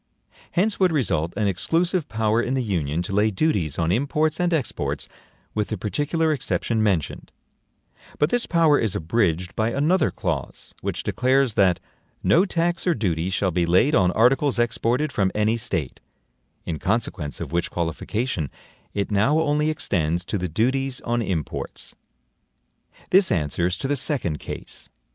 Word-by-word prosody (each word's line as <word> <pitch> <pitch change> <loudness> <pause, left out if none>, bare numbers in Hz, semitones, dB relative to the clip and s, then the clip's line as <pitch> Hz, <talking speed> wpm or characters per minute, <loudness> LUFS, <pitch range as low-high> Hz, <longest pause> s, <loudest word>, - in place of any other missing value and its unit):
Hence 200 +4 +1
would 185 -2 +4
result 85 - 0
an 105 - +1
exclusive 165 - 0
power 110 +1 +1
in 125 +2 -1
the 130 - 0
Union 85 -6 -1
to 95 - -5
lay 105 +2 +3
duties 95 - 0
on 80 0 +1
imports 150 - +1
and 175 0 +1
exports, 155 -8 -2 0.5
with 105 -1 -1
the 110 - -3
particular 150 - 0
exception 115 -4 -1
mentioned; 95 -8 -1 0.9
but 150 - +2
this 245 - +1
power 165 -4 +4
is 110 -4 -1
abridged 90 -1 0
by 110 +1 +1
another 150 +9 +2
clause, 80 -9 -4
which - - -3
declares 130 -1 +2
that 95 -4 +3 0.4
no 180 +4 +4
tax 170 -1 -1
or 175 - +3
duty 90 -5 -1
shall 95 0 0
be 85 0 +1
laid 95 - +4
on 95 -7 +4
articles 130 +4 +3
exported 120 +4 +1
from 95 -5 +1
any 105 +1 +2
State; 85 - -3 0.7
in 80 -3 -3
consequence 95 -8 -2
of 80 -4 -5
which 85 0 0
qualification, 85 - -2 0.5
it 100 +1 -1
now 110 +10 +3
only 150 -1 +1
extends 85 - -1
to 105 - -2
the 90 0 -2
DUTIES 130 - 0
ON 120 0 -1
IMPORTS. 90 -8 -4 1.2
This 190 0 +5
answers 85 +3 0
to 135 - -3
the 145 - +1
second 130 - -1
case. - - -7
110 Hz, 155 wpm, -23 LUFS, 90-145 Hz, 1.2 s, This